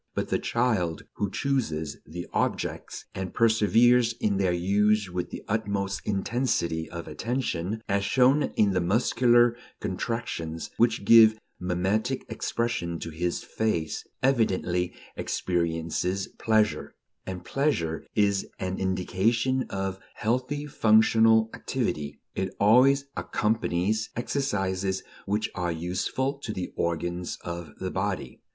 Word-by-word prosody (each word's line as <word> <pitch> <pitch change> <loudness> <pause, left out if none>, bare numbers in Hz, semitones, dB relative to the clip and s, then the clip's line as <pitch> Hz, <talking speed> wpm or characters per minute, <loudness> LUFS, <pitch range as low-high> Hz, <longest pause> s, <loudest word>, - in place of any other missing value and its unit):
But - - -2
the - - +1
child 110 -9 0
who 105 - 0
chooses 95 - -1
the 85 +4 -6
objects, - - -2
and 95 -1 -5
perseveres 115 +2 +4
in 105 -3 0
their 95 -2 +2
use 100 +3 +2
with 90 0 -3
the - - -7
utmost 100 -2 -1
intensity 95 -6 -1
of 85 -1 -7
attention, 110 -4 -2
as 100 0 +1
shown 130 +7 +4
in 105 -2 +4
the 95 - +1
muscular 120 +5 +4 0.2
contractions 90 -5 -3
which 115 -3 +2
give 110 0 +8 0.2
mimetic 95 +8 -1
expression 100 -8 -2
to 85 - -6
his 85 +2 -2
face, 85 -8 -1 0.2
evidently 95 -9 +1 0.2
experiences 85 +2 -1
pleasure, 110 -2 +1 0.3
and 90 -1 -6
pleasure 85 - 0
is 100 -2 +2
an 95 0 -3
indication 110 +8 +1
of 95 -1 -3 0.2
healthy 130 +6 -1
functional 110 -3 +4
activity; 75 - -3
it - - -3
always 130 +7 +5
accompanies 110 0 0
exercises 95 -7 -1 0.2
which 105 +2 0
are 90 -1 -1
useful 90 - -2
to 125 - -5
the 95 -4 -5
organs 85 +1 -2
of 85 -1 -6
the - - -4
body. - - -3
100 Hz, 120 wpm, -27 LUFS, 90-115 Hz, 0.3 s, give